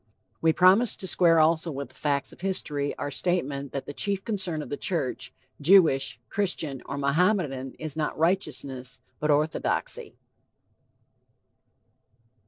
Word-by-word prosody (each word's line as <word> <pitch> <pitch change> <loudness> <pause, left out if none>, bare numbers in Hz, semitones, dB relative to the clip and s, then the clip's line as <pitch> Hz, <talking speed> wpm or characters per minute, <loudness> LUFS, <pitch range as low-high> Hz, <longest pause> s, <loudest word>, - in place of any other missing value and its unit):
We 165 - +4
promised 190 +7 +4
to 190 - -3
square 170 -3 +4
also 160 +1 +3
with 140 -4 -5
the - - -19
facts 140 +1 -1
of - - -15
history 150 -7 -2
our 145 - -4
statement 140 -6 -1
that 140 - -4
the 145 - -7
chief 200 +4 -2
concern 190 -8 -1
of - - -10
the - - -2
church, 155 -6 -2 0.3
Jewish, 140 -7 +4
Christian, 155 - -2
or 140 - -4
Mohammedan, 140 -2 +1
is 155 -2 -6
not 155 -1 -2
righteousness, 135 -7 -2 0.2
but 150 - -1
orthodoxy. 150 +2 0
155 Hz, 135 wpm, -26 LUFS, 140-180 Hz, 0.3 s, We